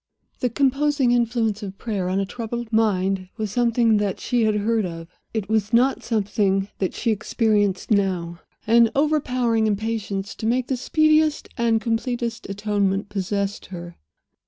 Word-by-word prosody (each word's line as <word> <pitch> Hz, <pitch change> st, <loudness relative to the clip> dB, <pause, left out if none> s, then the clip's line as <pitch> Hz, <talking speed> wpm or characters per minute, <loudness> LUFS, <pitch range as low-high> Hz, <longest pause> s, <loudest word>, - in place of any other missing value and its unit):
The 250 Hz, -, 0 dB
composing 275 Hz, +1 st, +2 dB
influence 235 Hz, -3 st, +1 dB
of 195 Hz, -1 st, -7 dB
prayer 200 Hz, -6 st, -2 dB
on 190 Hz, +1 st, 0 dB
a 195 Hz, -, 0 dB
troubled 235 Hz, +2 st, -5 dB
mind 195 Hz, -4 st, +1 dB
was 215 Hz, -3 st, -3 dB
something 235 Hz, -1 st, +3 dB
that 205 Hz, -2 st, -1 dB
she 240 Hz, -3 st, +1 dB
had 215 Hz, -1 st, +2 dB
heard 220 Hz, +1 st, +1 dB
of. 165 Hz, -2 st, -6 dB, 0.2 s
It 215 Hz, -4 st, -3 dB
was 220 Hz, 0 st, 0 dB
not 255 Hz, +3 st, +3 dB
something 200 Hz, -3 st, 0 dB
that 190 Hz, -, -1 dB
she 230 Hz, -, 0 dB
experienced 210 Hz, -2 st, 0 dB
now. 180 Hz, -4 st, 0 dB, 0.3 s
An 230 Hz, +1 st, +5 dB
overpowering 255 Hz, -6 st, +1 dB
impatience 205 Hz, -2 st, -2 dB
to 220 Hz, -, -3 dB
make 245 Hz, +2 st, +1 dB
the 265 Hz, -, +1 dB
speediest 310 Hz, +3 st, +2 dB
and 230 Hz, -2 st, +2 dB
completest 230 Hz, 0 st, -2 dB
atonement 200 Hz, -1 st, -1 dB
possessed 200 Hz, 0 st, -2 dB
her. 175 Hz, -2 st, -8 dB
220 Hz, 150 wpm, -23 LUFS, 195-240 Hz, 0.3 s, An